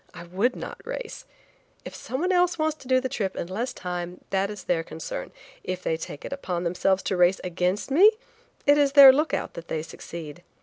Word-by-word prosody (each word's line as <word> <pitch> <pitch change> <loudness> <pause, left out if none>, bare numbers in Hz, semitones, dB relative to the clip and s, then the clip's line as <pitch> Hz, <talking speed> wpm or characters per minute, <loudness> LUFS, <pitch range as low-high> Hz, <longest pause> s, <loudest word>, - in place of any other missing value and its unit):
I 170 - -8
would 195 +9 0
not - - -8
race. - - -6 0.6
If - - -7
someone 325 +9 -2
else 360 -1 +2
wants 310 -1 0
to 270 - -14
do 255 0 +4
the 260 - -2
trip 200 -6 -3
in - - -3
less 215 +8 -3
time, 180 0 -5
that 195 +1 +1
is 210 -2 -8
their 170 -2 0
concern. 160 0 -7 0.3
If 185 0 -4
they 160 - 0
take 160 -2 -8
it - - -5
upon 180 -11 -3
themselves 185 +2 +1
to 190 - -1
race 180 +1 +4
against 180 +6 -1
me, 370 +10 +7 0.6
it 290 +1 +5
is 280 -1 +3
their 275 -2 +10
lookout 305 +4 -1
that 170 0 -9
they 155 -1 -3
succeed. 165 0 -9
190 Hz, 205 wpm, -25 LUFS, 175-275 Hz, 0.6 s, their